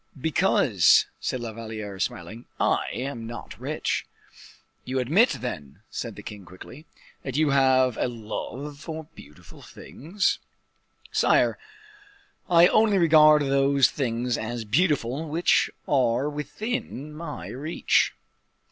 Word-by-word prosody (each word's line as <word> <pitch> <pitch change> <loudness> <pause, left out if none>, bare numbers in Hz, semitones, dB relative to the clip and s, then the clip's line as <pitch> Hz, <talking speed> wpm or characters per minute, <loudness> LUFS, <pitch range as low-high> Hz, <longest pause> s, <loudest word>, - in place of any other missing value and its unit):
"Because," 160 +2 +3
said 130 - -3
La 115 -2 -5
Valliere, 110 -3 -7
smiling, 95 +6 -4
"I - - +1
am 120 -3 -5
not 120 +1 -9
rich." - - -2 0.8
"You 130 +1 -3
admit, 160 - +3
then," 75 - -6
said 115 -3 -5
the 105 - -10
king, 105 -2 -9
quickly, 95 - -13 0.3
"that 135 0 -4
you 155 -2 +2
have 130 -2 +3
a - - 0
love 125 +5 -6
for 160 0 -6
beautiful 75 +1 -15
things?" 180 +8 -3 0.7
"Sire, - - +2 0.9
I 170 -1 +7
only 215 -2 +3
regard 155 -3 +6
those 140 0 +3
things 120 -2 -2
as 115 0 -4
beautiful 145 - 0
which 165 +4 +2 0.2
are 130 -1 +2
within 150 - -5
my 150 -1 -7
reach. 150 +6 0
135 Hz, 120 wpm, -25 LUFS, 115-155 Hz, 0.9 s, I